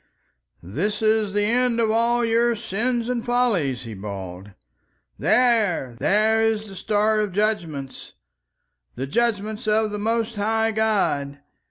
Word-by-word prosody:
"There 125 Hz, -, -2 dB
is 215 Hz, -1 st, 0 dB
the 205 Hz, 0 st, +1 dB
end 235 Hz, +2 st, +1 dB
of 225 Hz, -2 st, +2 dB
all 235 Hz, +1 st, +2 dB
your 230 Hz, +1 st, +2 dB
Sins 235 Hz, +4 st, -2 dB
and 245 Hz, -2 st, -2 dB
Follies," 215 Hz, -, 0 dB
he 115 Hz, -2 st, -7 dB
bawled. 95 Hz, -1 st, -7 dB, 0.7 s
"There! 215 Hz, -, +2 dB
There 220 Hz, +2 st, +3 dB
is 220 Hz, -1 st, 0 dB
the 195 Hz, -, -11 dB
Star 215 Hz, +3 st, +1 dB
of 210 Hz, -3 st, -1 dB
Judgments, 170 Hz, -10 st, -2 dB, 0.8 s
the 130 Hz, -, -3 dB
Judgments 215 Hz, -, -1 dB
of 215 Hz, 0 st, +2 dB
the 210 Hz, -, -4 dB
most 225 Hz, +1 st, -1 dB
High 220 Hz, +2 st, +1 dB
God! 200 Hz, -11 st, 0 dB
215 Hz, 135 wpm, -23 LUFS, 185-230 Hz, 0.8 s, There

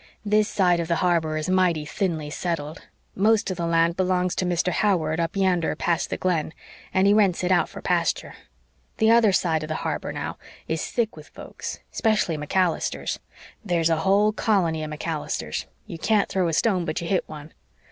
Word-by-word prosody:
"This 210 Hz, +1 st, +2 dB
side 180 Hz, -3 st, +2 dB
of 170 Hz, -, -2 dB
the 170 Hz, -, +1 dB
harbor 160 Hz, -3 st, +1 dB
is 155 Hz, -, -3 dB
mighty 180 Hz, -4 st, +2 dB
thinly 155 Hz, -2 st, -2 dB
settled. 165 Hz, -2 st, -4 dB, 0.3 s
Most 210 Hz, 0 st, +2 dB
of 185 Hz, -, -4 dB
the 170 Hz, -1 st, -2 dB
land 165 Hz, 0 st, +2 dB
belongs 180 Hz, -1 st, +1 dB
to 185 Hz, -, 0 dB
Mr. 180 Hz, +1 st, +1 dB
Howard 165 Hz, -5 st, +1 dB
up 165 Hz, +2 st, -1 dB
yander 185 Hz, -4 st, +1 dB
past 170 Hz, -1 st, 0 dB
the -, -, -2 dB
Glen, 165 Hz, -4 st, -1 dB, 0.4 s
and 190 Hz, 0 st, +2 dB
he 200 Hz, -, +5 dB
rents 200 Hz, -4 st, +3 dB
it 180 Hz, -, +1 dB
out 180 Hz, -, +3 dB
for -, -, -10 dB
pasture. -, -, 0 dB, 0.6 s
The 220 Hz, 0 st, +4 dB
other 230 Hz, -3 st, +5 dB
side 165 Hz, -4 st, +1 dB
of 155 Hz, -, -5 dB
the 155 Hz, -, -2 dB
harbor, -, -, -2 dB
now, -, -, -5 dB, 0.3 s
is 160 Hz, 0 st, -2 dB
thick 230 Hz, -2 st, -1 dB
with 155 Hz, -1 st, -12 dB
folks -, -, -8 dB
'specially 215 Hz, -7 st, +1 dB
MacAllisters. 165 Hz, +4 st, -1 dB, 0.4 s
There's 170 Hz, -4 st, +1 dB
a 165 Hz, -, +3 dB
whole 200 Hz, +6 st, +3 dB
colony 185 Hz, -8 st, +1 dB
of 155 Hz, -, -5 dB
MacAllisters 155 Hz, 0 st, -4 dB, 0.2 s
you 165 Hz, -, -8 dB
can't 210 Hz, +3 st, +2 dB
throw 185 Hz, -2 st, +1 dB
a 165 Hz, -, -1 dB
stone 185 Hz, +1 st, +2 dB
but 155 Hz, -1 st, -2 dB
you 170 Hz, -, -5 dB
hit 190 Hz, 0 st, 0 dB
one. 155 Hz, 0 st, -10 dB
175 Hz, 190 wpm, -24 LUFS, 160-195 Hz, 0.6 s, he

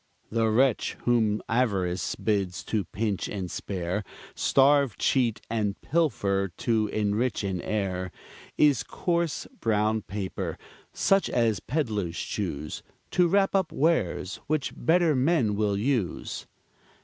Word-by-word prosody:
The 115 Hz, 0 st, +2 dB
wretch 125 Hz, +2 st, +2 dB
whom 110 Hz, -3 st, +2 dB
avarice 95 Hz, -, 0 dB
bids 100 Hz, -5 st, -1 dB
to 105 Hz, -4 st, -1 dB
pinch 105 Hz, +1 st, -2 dB
and 95 Hz, -4 st, -4 dB
spare, 95 Hz, +1 st, -3 dB, 0.3 s
Starve, 140 Hz, -3 st, +3 dB
cheat, 120 Hz, -5 st, +1 dB
and 105 Hz, -3 st, -1 dB
pilfer, 100 Hz, -, +1 dB
to 110 Hz, -2 st, +1 dB
enrich 105 Hz, +3 st, 0 dB
an 95 Hz, -3 st, -2 dB
heir, 95 Hz, -4 st, -2 dB, 0.5 s
Is 145 Hz, -5 st, +4 dB
coarse 170 Hz, -3 st, -1 dB
brown 110 Hz, 0 st, +1 dB
paper, 100 Hz, -1 st, -4 dB, 0.3 s
such 195 Hz, 0 st, +2 dB
as 115 Hz, -4 st, +1 dB
peddlers 110 Hz, -, -2 dB
choose 75 Hz, -7 st, -4 dB, 0.3 s
To 180 Hz, -1 st, +4 dB
wrap 195 Hz, +2 st, +3 dB
up 190 Hz, -4 st, +1 dB
wares 120 Hz, -, 0 dB
which 155 Hz, -2 st, -1 dB
better 165 Hz, -2 st, +3 dB
men 130 Hz, -5 st, +2 dB
will 105 Hz, -1 st, +1 dB
use. 115 Hz, -4 st, -2 dB
110 Hz, 120 wpm, -27 LUFS, 100-135 Hz, 0.5 s, Is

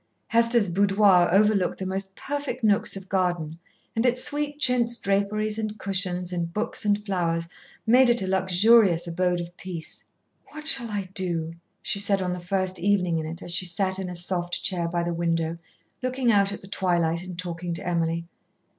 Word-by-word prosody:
Hester's 230 Hz, -2 st, +3 dB
boudoir 195 Hz, -1 st, +4 dB
overlooked 200 Hz, -1 st, +3 dB
the 190 Hz, -, -5 dB
most 190 Hz, +1 st, -3 dB
perfect 280 Hz, -3 st, -4 dB
nooks 205 Hz, -2 st, +2 dB
of 190 Hz, 0 st, -10 dB
garden, 175 Hz, -4 st, -1 dB, 0.4 s
and 225 Hz, -, +1 dB
its 250 Hz, 0 st, +2 dB
sweet 290 Hz, 0 st, -1 dB
chintz 245 Hz, -4 st, +2 dB
draperies 210 Hz, +2 st, 0 dB
and 215 Hz, -1 st, -4 dB
cushions 180 Hz, -3 st, 0 dB
and 170 Hz, -1 st, -2 dB
books 215 Hz, +6 st, -2 dB
and 205 Hz, 0 st, +1 dB
flowers 170 Hz, -4 st, -1 dB, 0.4 s
made 250 Hz, +2 st, +5 dB
it 240 Hz, 0 st, +3 dB
a -, -, -3 dB
luxurious 190 Hz, 0 st, +4 dB
abode 180 Hz, +1 st, 0 dB
of 175 Hz, 0 st, -7 dB
peace. 175 Hz, -3 st, -7 dB, 0.4 s
"What 305 Hz, 0 st, -10 dB
shall 250 Hz, -7 st, +2 dB
I 200 Hz, -3 st, -4 dB
do," 170 Hz, -4 st, -2 dB, 0.3 s
she 200 Hz, -, 0 dB
said 200 Hz, -1 st, +2 dB
on 185 Hz, -1 st, -2 dB
the 180 Hz, -, -5 dB
first 185 Hz, +1 st, -2 dB
evening 180 Hz, -3 st, +1 dB
in 155 Hz, -, -4 dB
it 165 Hz, +3 st, -6 dB
as 175 Hz, -, -7 dB
she 180 Hz, +2 st, 0 dB
sat 190 Hz, +2 st, 0 dB
in 190 Hz, -1 st, -4 dB
a 180 Hz, -, -6 dB
soft 175 Hz, 0 st, -1 dB
chair 175 Hz, -3 st, -1 dB
by 170 Hz, 0 st, -1 dB
the 170 Hz, 0 st, -2 dB
window, 165 Hz, -1 st, -1 dB, 0.4 s
looking 255 Hz, -1 st, +1 dB
out 200 Hz, -2 st, +3 dB
at 200 Hz, -, -7 dB
the -, -, -10 dB
twilight 175 Hz, -4 st, 0 dB
and 180 Hz, -1 st, -8 dB
talking 175 Hz, -1 st, -5 dB
to 170 Hz, -, -5 dB
Emily. 170 Hz, -1 st, -1 dB
190 Hz, 185 wpm, -25 LUFS, 175-210 Hz, 0.4 s, made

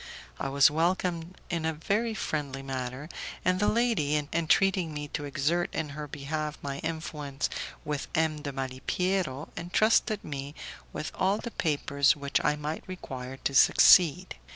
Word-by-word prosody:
I 135 Hz, -, -2 dB
was 140 Hz, +1 st, +5 dB
welcomed 170 Hz, +1 st, -1 dB
in 170 Hz, -2 st, -1 dB
a 160 Hz, 0 st, 0 dB
very 215 Hz, +8 st, 0 dB
friendly 140 Hz, -8 st, -3 dB
manner, 130 Hz, +1 st, -4 dB, 0.4 s
and 185 Hz, 0 st, +3 dB
the 210 Hz, -, +2 dB
lady, 220 Hz, -11 st, +2 dB, 0.2 s
entreating 170 Hz, 0 st, +2 dB
me 145 Hz, 0 st, -4 dB
to 145 Hz, -, -4 dB
exert 150 Hz, +5 st, 0 dB
in 160 Hz, -2 st, -2 dB
her 150 Hz, +1 st, -6 dB
behalf 150 Hz, +2 st, -4 dB
my 140 Hz, 0 st, -4 dB
influence 150 Hz, -4 st, -3 dB, 0.3 s
with 150 Hz, -2 st, -3 dB
M. 160 Hz, -2 st, +1 dB
de 145 Hz, -1 st, -4 dB
Malipiero, 135 Hz, +4 st, -2 dB
entrusted 215 Hz, +4 st, +2 dB
me 140 Hz, 0 st, -6 dB, 0.4 s
with 155 Hz, -, -5 dB
all 195 Hz, +2 st, +1 dB
the 235 Hz, -, -6 dB
papers 145 Hz, -4 st, +2 dB
which 140 Hz, -1 st, -1 dB
I 150 Hz, -, +3 dB
might 150 Hz, +1 st, -4 dB
require 135 Hz, -8 st, -7 dB
to 140 Hz, -, 0 dB
succeed. 180 Hz, +5 st, +6 dB
150 Hz, 150 wpm, -29 LUFS, 140-180 Hz, 0.4 s, succeed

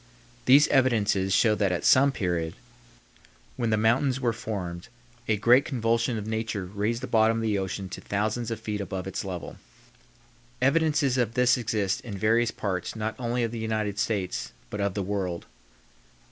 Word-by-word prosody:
These 140 Hz, +4 st, +7 dB
evidences 105 Hz, -8 st, +2 dB
show 110 Hz, +3 st, +4 dB
that 100 Hz, -3 st, +1 dB
at 90 Hz, -, -2 dB
some 140 Hz, +2 st, +6 dB
period, 85 Hz, -9 st, -2 dB, 1.0 s
when 120 Hz, -3 st, -1 dB
the 110 Hz, -, +2 dB
mountains 125 Hz, +5 st, +2 dB
were 120 Hz, -3 st, 0 dB
formed, 90 Hz, -6 st, -5 dB, 0.4 s
a 110 Hz, -, +2 dB
great 120 Hz, +6 st, +5 dB
convulsion 115 Hz, -2 st, 0 dB
of 105 Hz, -, -5 dB
nature 110 Hz, -3 st, -3 dB
raised 105 Hz, +5 st, -2 dB
the -, -, -3 dB
bottom 110 Hz, 0 st, +3 dB
of 115 Hz, -, -2 dB
the 105 Hz, -3 st, +1 dB
ocean 95 Hz, 0 st, -4 dB
to -, -, -7 dB
thousands 110 Hz, +3 st, -2 dB
of 115 Hz, -1 st, -4 dB
feet 105 Hz, -2 st, -4 dB
above 95 Hz, -2 st, -4 dB
its 95 Hz, 0 st, -4 dB
level. 90 Hz, -3 st, -6 dB, 1.0 s
Evidences 140 Hz, -1 st, +2 dB
of 115 Hz, -2 st, 0 dB
this 125 Hz, 0 st, +4 dB
exist 105 Hz, -5 st, -1 dB
in 105 Hz, -5 st, -7 dB
various 115 Hz, +3 st, +2 dB
parts 95 Hz, -4 st, -3 dB
not 110 Hz, 0 st, -2 dB
only 120 Hz, 0 st, -1 dB
of 115 Hz, -, -1 dB
the 115 Hz, -, -5 dB
United 110 Hz, -2 st, -2 dB
States, 105 Hz, -5 st, -2 dB, 0.2 s
but 105 Hz, -, -3 dB
of 100 Hz, -2 st, -1 dB
the 100 Hz, -, -1 dB
world. 95 Hz, -3 st, -3 dB
110 Hz, 175 wpm, -26 LUFS, 100-120 Hz, 1.0 s, These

